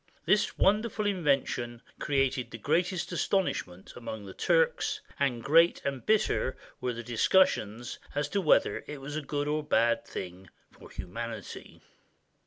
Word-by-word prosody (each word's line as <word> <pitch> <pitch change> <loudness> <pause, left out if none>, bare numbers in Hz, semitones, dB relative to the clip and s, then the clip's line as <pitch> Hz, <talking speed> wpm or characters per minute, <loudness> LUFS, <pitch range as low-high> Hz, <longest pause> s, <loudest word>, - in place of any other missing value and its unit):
This 210 -1 +2
wonderful 210 +1 +2
invention 140 - 0 0.2
created 135 -3 0
the 115 - -7
greatest 175 - 0
astonishment 95 - -1
amongst 110 -3 -7
the 95 - -9
Turks, 480 -3 +1 0.2
and 125 -5 0
great 165 +4 +5
and 135 -2 -2
bitter 215 -10 +1 0.2
were 125 - -2
the 120 +1 -6
discussions 120 - +2 0.2
as 145 0 0
to 200 - 0
whether 155 - +3
it 150 -1 -6
was 140 +2 -6
a 155 - -1
good 145 0 -2
or 150 +1 +1
a - - -3
bad 120 -5 +2
thing 90 0 -8 0.2
for - - -15
humanity. 115 +1 -7
140 Hz, 145 wpm, -29 LUFS, 115-180 Hz, 0.2 s, great